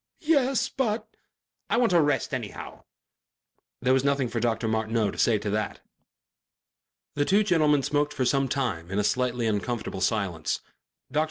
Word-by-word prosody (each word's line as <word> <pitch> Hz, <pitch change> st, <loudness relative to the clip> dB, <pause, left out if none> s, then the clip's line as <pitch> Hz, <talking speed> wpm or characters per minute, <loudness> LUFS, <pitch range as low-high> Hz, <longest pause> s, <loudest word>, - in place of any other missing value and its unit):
"Yes, 270 Hz, -4 st, +2 dB
but 225 Hz, -5 st, -2 dB, 0.3 s
" -, -, -56 dB
"I -, -, +2 dB
want 235 Hz, -6 st, +3 dB
a 170 Hz, -, +6 dB
rest 145 Hz, -2 st, 0 dB
anyhow...." 120 Hz, -6 st, -6 dB, 1.0 s
There 130 Hz, +1 st, +4 dB
was 130 Hz, 0 st, +2 dB
nothing 140 Hz, -3 st, +1 dB
for 115 Hz, -, -2 dB
Dr. 115 Hz, -1 st, 0 dB
Martineau 110 Hz, -1 st, 0 dB
to -, -, -11 dB
say 115 Hz, -2 st, +4 dB
to 105 Hz, 0 st, -4 dB
that. 105 Hz, -1 st, -2 dB, 1.3 s
The 145 Hz, -, +1 dB
two 200 Hz, +7 st, +3 dB
gentlemen 155 Hz, -7 st, +3 dB
smoked 145 Hz, +1 st, 0 dB
for 130 Hz, -, 0 dB
some 135 Hz, +1 st, +2 dB
time 110 Hz, -12 st, -2 dB
in 95 Hz, -, -3 dB
a 105 Hz, -, +2 dB
slightly 125 Hz, +1 st, 0 dB
uncomfortable 110 Hz, -2 st, -2 dB
silence. 95 Hz, -8 st, -1 dB, 0.5 s
Dr. 150 Hz, -, +1 dB
125 Hz, 165 wpm, -26 LUFS, 110-150 Hz, 1.3 s, a